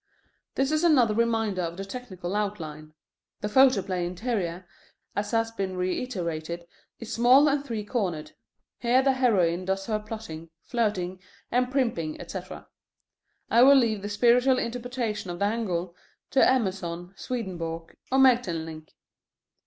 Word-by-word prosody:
This 270 +2 +1
is 310 +1 +1
another 260 -10 +5
reminder 225 -4 +1
of 170 0 -4
the 195 - -5
technical 195 -5 -6
outline. 155 -7 -4 0.5
The 210 - -1
photoplay 205 -7 +3
interior, 180 -2 -3 0.5
as 205 0 -1
has 225 0 +1
been 195 -4 -3
reiterated, 175 -4 -3 0.3
is 230 0 -7
small 255 +5 +6
and 285 -1 +1
three 225 -6 -4
cornered. 175 -10 -2 0.5
Here 250 +2 +3
the 270 - +4
heroine 185 -9 +2
does 195 +1 -1
her 215 0 -1
plotting, 210 -7 -8
flirting, 190 -6 -1 0.3
and 250 +1 +2
primping, 230 - -1
etc. - - -8 0.8
I 235 - +6
will 275 +2 +8
leave 225 -6 +2
the 205 - -5
spiritual 245 +5 +4
interpretation 235 -4 -3
of 175 - -4
the 200 - +1
angle 185 -6 -2 0.4
to 270 - +5
Emerson, 185 -7 0
Swedenborg, 170 -8 -5 0.2
or 265 - +3
Maeterlinck. 165 -12 +2
210 Hz, 135 wpm, -27 LUFS, 175-245 Hz, 0.8 s, will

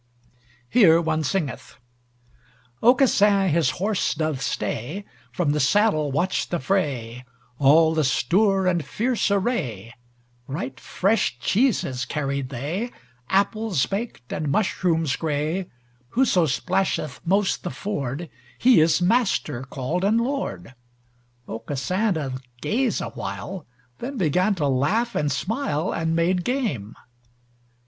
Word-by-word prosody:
Here 165 - +6
one 160 -1 0
singeth: 155 -3 -3 1.1
Aucassin 210 -6 +4
his 165 0 +2
horse 200 -1 0
doth 155 -3 -2
stay, 135 - -3 0.3
From 165 -5 0
the 150 - 0
saddle 155 -1 +2
watched 175 +7 0
the 175 - -1
fray, 130 -8 -1 0.4
All 160 +3 +5
the 160 -1 +1
stour 190 - +2
and 175 -3 +1
fierce 240 +6 0
array; 170 - -1 0.5
Right 135 -2 -5
fresh 195 - 0
cheeses 135 - +1
carried 140 -1 -2
they, 150 - -3 0.4
Apples 200 - +1
baked, 200 - -5
and 150 -1 -2
mushrooms 165 -4 +1
grey, 160 +4 -2 0.5
Whoso 190 -10 +4
splasheth 155 -1 -1
most 195 +3 +1
the 180 - -4
ford 155 -5 -4 0.3
He 250 -4 +5
is 160 +2 +3
master 190 - +1
called 140 +7 -3
and 215 +4 +3
lord. 230 - -3 0.7
Aucassin 150 - -1
doth 135 -4 -4 0.2
gaze 235 - 0
awhile, 185 -4 -6 0.3
Then 265 +2 -5
began 185 +3 +2
to 150 -5 0
laugh 190 - +1
and 150 -1 0
smile 180 - -1
And 165 0 -1
made 175 +2 +1
game. 170 - -2
170 Hz, 115 wpm, -24 LUFS, 140-200 Hz, 1.1 s, Here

